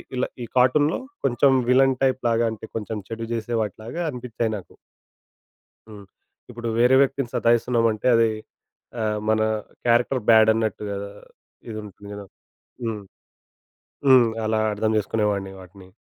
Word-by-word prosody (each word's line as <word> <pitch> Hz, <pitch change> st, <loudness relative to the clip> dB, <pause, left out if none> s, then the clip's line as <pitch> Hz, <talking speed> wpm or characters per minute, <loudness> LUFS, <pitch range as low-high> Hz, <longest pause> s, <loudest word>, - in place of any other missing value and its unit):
ఇలా 125 Hz, -, 0 dB, 0.2 s
ఈ -, -, -4 dB
కార్టూన్‌లో 145 Hz, +5 st, +3 dB, 0.3 s
కొంచెం 135 Hz, +1 st, +3 dB, 0.2 s
విలన్ 135 Hz, +1 st, +4 dB
టైప్ 130 Hz, -1 st, +2 dB
లాగా 115 Hz, 0 st, +2 dB
అంటే 110 Hz, -, -9 dB
కొంచెం 110 Hz, 0 st, -4 dB
చెడు 115 Hz, 0 st, -5 dB
చేసే 115 Hz, +1 st, -3 dB
వాటిలాగా 110 Hz, -, -5 dB
అనిపించాయి 120 Hz, -4 st, -3 dB
నాకు. 95 Hz, -, -13 dB, 1.2 s
హ్మ్. 105 Hz, -2 st, -11 dB, 0.5 s
ఇప్పుడు 120 Hz, 0 st, -5 dB
వేరే 125 Hz, +2 st, +5 dB
వ్యక్తిని 135 Hz, -2 st, -1 dB
సతాయిస్తున్నామంటే 115 Hz, -1 st, +1 dB
అది 115 Hz, 0 st, +4 dB, 0.7 s
అహ్, 105 Hz, -1 st, -1 dB
మన 110 Hz, 0 st, +2 dB, 0.5 s
క్యారెక్టర్ 120 Hz, +2 st, +2 dB
బ్యాడ్ 110 Hz, -1 st, +7 dB
అన్నట్టుగ‌దా 105 Hz, -2 st, -3 dB, 0.6 s
ఇది 110 Hz, -, -6 dB
ఉంటుంది 100 Hz, 0 st, -12 dB
కదా! 100 Hz, 0 st, -8 dB, 0.6 s
హ్మ్. 110 Hz, -3 st, -3 dB, 1.1 s
హ్మ్. 130 Hz, -3 st, +7 dB, 0.2 s
అలా 110 Hz, 0 st, +1 dB
అర్థం 110 Hz, +1 st, 0 dB
చేసుకునేవాడిని 105 Hz, -2 st, -1 dB
వాటిని. 95 Hz, 0 st, -14 dB
115 Hz, 125 wpm, -23 LUFS, 105-125 Hz, 1.2 s, బ్యాడ్